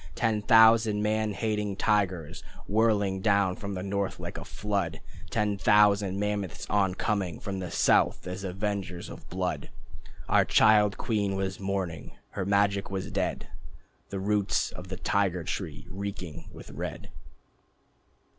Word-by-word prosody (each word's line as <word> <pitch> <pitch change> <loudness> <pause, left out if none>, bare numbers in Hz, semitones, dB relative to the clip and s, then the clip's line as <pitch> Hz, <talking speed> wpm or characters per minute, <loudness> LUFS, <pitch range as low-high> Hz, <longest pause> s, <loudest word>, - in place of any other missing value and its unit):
Ten 110 -2 +1
thousand 110 -1 +5
man 110 0 0
hating 105 -1 -1
tigers 95 -6 0 0.2
Whirling 105 -3 +1
down 100 -3 +2
from 100 -1 -5
the 90 - -4
north, 100 0 -2
like - - -6
a - - -7
flood! 100 -6 -3 0.3
Ten 105 -1 0
thousand 105 -2 +4
mammoths 105 -3 -2
oncoming 95 -2 0
From 95 -1 -4
the 90 -2 -4
south - - +2
as 90 +2 -5
avengers 95 -2 -3
of - - -11
blood! 90 -5 -3 0.6
Our - - +4
child 105 -2 +4
queen 100 -4 -1
was 95 0 -2
mourning, 95 -6 -3 0.2
her 95 - -4
magic 100 0 +2
was 95 -1 -4
dead, - - -2 0.6
The 100 - -4
roots 100 0 +1
of 90 - -9
the 95 0 -6
Tiger 95 -3 0
Tree 80 -3 -5
reeking 95 -4 -6
with - - -11
red. - - -6
100 Hz, 135 wpm, -28 LUFS, 95-105 Hz, 0.6 s, thousand